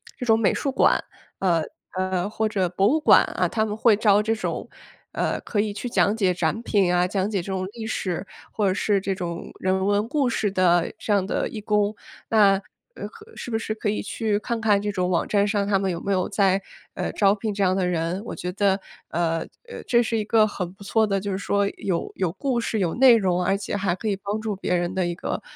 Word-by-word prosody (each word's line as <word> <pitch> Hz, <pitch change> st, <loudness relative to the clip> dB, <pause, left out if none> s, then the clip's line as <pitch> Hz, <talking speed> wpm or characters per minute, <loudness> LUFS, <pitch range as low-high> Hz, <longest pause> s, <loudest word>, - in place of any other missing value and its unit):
这 260 Hz, -, -7 dB
种 225 Hz, -1 st, +4 dB
美 215 Hz, -, +3 dB
术 275 Hz, -, -1 dB
馆， -, -, +3 dB, 0.4 s
呃 170 Hz, -4 st, +2 dB, 0.3 s
呃， 185 Hz, 0 st, -1 dB
或 220 Hz, +1 st, -1 dB
者 195 Hz, -4 st, 0 dB
博 195 Hz, +3 st, +2 dB
物 305 Hz, +7 st, +3 dB
馆 -, -, +7 dB
啊， -, -, -1 dB
他 220 Hz, -1 st, 0 dB
们 210 Hz, -1 st, -3 dB
会 225 Hz, -1 st, +5 dB
招 205 Hz, -1 st, +4 dB
这 225 Hz, +1 st, +1 dB
种， 220 Hz, -, -4 dB, 0.5 s
呃， -, -, -1 dB
可 210 Hz, -, -3 dB
以 210 Hz, 0 st, 0 dB
去 245 Hz, -, -5 dB
讲 210 Hz, -2 st, +2 dB
解 195 Hz, -5 st, +2 dB
展 175 Hz, +3 st, -1 dB
品 195 Hz, -6 st, +2 dB
啊， 180 Hz, 0 st, +3 dB
讲 195 Hz, +1 st, -1 dB
解 205 Hz, -3 st, -1 dB
这 -, -, -11 dB
种 185 Hz, -1 st, -2 dB
历 225 Hz, -2 st, -6 dB
史 185 Hz, -4 st, -3 dB, 0.3 s
或 210 Hz, -2 st, 0 dB
者 185 Hz, -, +2 dB
是 200 Hz, +1 st, +1 dB
这 195 Hz, 0 st, -2 dB
种 170 Hz, -2 st, -5 dB
人 190 Hz, 0 st, 0 dB
文 205 Hz, +2 st, +1 dB
故 280 Hz, +1 st, +1 dB
事 220 Hz, -2 st, 0 dB
的 175 Hz, -3 st, +3 dB
这 210 Hz, -, -1 dB
样 200 Hz, -2 st, +2 dB
的 -, -, -1 dB
义 220 Hz, -, -6 dB
工。 210 Hz, 0 st, +1 dB, 0.3 s
那， 210 Hz, -3 st, +5 dB, 0.4 s
呃 -, -, -6 dB
和 455 Hz, 0 st, -15 dB
是 -, -, -7 dB
不 225 Hz, -, +1 dB
是 220 Hz, -, -3 dB
可 215 Hz, -, -2 dB
以 210 Hz, -, -1 dB
去 210 Hz, 0 st, -1 dB
看 230 Hz, +2 st, -3 dB
看 210 Hz, -3 st, +3 dB
这 210 Hz, -, -2 dB
种 180 Hz, -2 st, -1 dB
网 175 Hz, -, +1 dB
站 205 Hz, -1 st, +2 dB
上 205 Hz, -1 st, 0 dB
他 200 Hz, -1 st, +3 dB
们 195 Hz, 0 st, -1 dB
有 170 Hz, -, -4 dB
没 200 Hz, -, -3 dB
有 185 Hz, -2 st, +1 dB
在， 195 Hz, -1 st, +2 dB, 0.3 s
呃， -, -, -3 dB
招 200 Hz, -1 st, +4 dB
聘 215 Hz, +1 st, -3 dB
这 200 Hz, 0 st, -1 dB
样 185 Hz, -1 st, +2 dB
的 185 Hz, -2 st, +1 dB
人？ 170 Hz, +2 st, -1 dB
我 -, -, -5 dB
觉 180 Hz, -, -4 dB
得， 195 Hz, 0 st, +1 dB, 0.3 s
呃 165 Hz, -1 st, 0 dB, 0.3 s
呃， 475 Hz, -, -8 dB
这 240 Hz, -1 st, +4 dB
是 230 Hz, -, -2 dB
一 -, -, -1 dB
个 215 Hz, +1 st, +4 dB
很 185 Hz, -4 st, -4 dB
不 200 Hz, +1 st, -14 dB
错 220 Hz, +2 st, +2 dB
的， 195 Hz, -1 st, 0 dB
就 200 Hz, +1 st, -4 dB
是 190 Hz, -, -1 dB
说 200 Hz, 0 st, 0 dB
有 180 Hz, -4 st, -2 dB
有 185 Hz, -4 st, -1 dB
故 240 Hz, +6 st, -1 dB
事、 225 Hz, -, -2 dB
有 175 Hz, -4 st, 0 dB
内 255 Hz, -1 st, +7 dB
容， 180 Hz, -4 st, +1 dB
而 195 Hz, +2 st, +1 dB
且 200 Hz, -, -4 dB
还 190 Hz, -3 st, 0 dB
可 220 Hz, -, -5 dB
以 205 Hz, -, +1 dB
帮 200 Hz, +2 st, -4 dB
助 215 Hz, -2 st, -3 dB
别 185 Hz, -1 st, -1 dB
人 175 Hz, +1 st, -1 dB
的 185 Hz, -2 st, 0 dB
一 175 Hz, -, -3 dB
个， -, -, -4 dB
200 Hz, 265 characters per minute, -24 LUFS, 185-215 Hz, 0.5 s, 馆